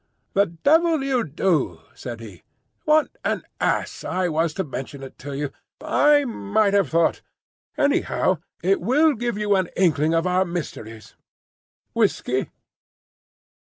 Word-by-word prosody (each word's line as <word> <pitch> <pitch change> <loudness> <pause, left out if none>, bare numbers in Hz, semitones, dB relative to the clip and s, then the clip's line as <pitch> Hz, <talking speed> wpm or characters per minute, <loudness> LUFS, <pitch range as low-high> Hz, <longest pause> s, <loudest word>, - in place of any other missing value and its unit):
"The 200 +1 +3
devil 310 - +2
you 260 -3 +1
do!" 150 - 0
said 120 -2 -7
he. 100 -7 -11 0.4
"What 305 0 +4
an - - -1 0.2
ass - - -1
I 185 -1 -1
was 165 0 +1
to 190 - -1
mention 135 -2 -7
it 135 - -11
to 140 0 -6
you! 145 -1 -3 0.3
I 290 -1 +3
might 215 -3 0
have 200 -8 +3
thought. 165 0 +2 0.6
Anyhow, 280 - +1 0.2
it 195 +2 +2
will 290 - +3
give 235 -3 -3
you 210 -1 +2
an 185 -2 0
inkling 160 -3 +2
of 165 +1 +1
our—mysteries. 170 - -3 0.8
Whiskey?" - - 0
185 Hz, 130 wpm, -23 LUFS, 150-235 Hz, 0.8 s, What